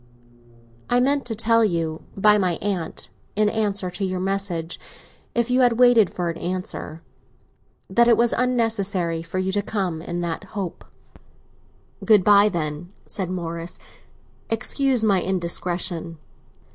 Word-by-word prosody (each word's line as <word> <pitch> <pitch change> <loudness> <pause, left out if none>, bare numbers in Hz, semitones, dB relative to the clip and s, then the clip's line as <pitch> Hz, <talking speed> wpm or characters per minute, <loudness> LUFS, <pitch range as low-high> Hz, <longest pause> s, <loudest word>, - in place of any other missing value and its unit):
"I 245 - +4
meant 275 +2 +1
to 225 - -2
tell 230 +1 +3
you, 165 -5 -1 0.2
by 210 +1 +5
my 185 -3 +1
aunt, 185 -3 -3 0.2
in 210 0 +3
answer 205 -4 -1
to 180 +3 -4
your 185 -1 -1
message—if 195 +5 -4
you 255 +1 +4
had 245 -2 +5
waited 240 -6 +6
for 175 -1 -3
an 165 - -8
answer—that 180 +5 -4
it 235 -2 +5
was 235 0 +3
unnecessary 205 -9 0
for 165 +3 -6
you 185 0 0
to 205 +1 0
come 190 -6 -2
in 175 +1 -4
that 170 +2 -3
hope." 185 -4 -5 1.2
"Good 210 -4 +5
bye, 205 +1 +6
then," 165 -1 -4
said 190 -3 -4
Morris. 170 -1 -5 0.7
"Excuse 245 +2 +1
my 200 -4 +3
indiscretion." 175 -2 -2
190 Hz, 135 wpm, -23 LUFS, 175-220 Hz, 1.2 s, waited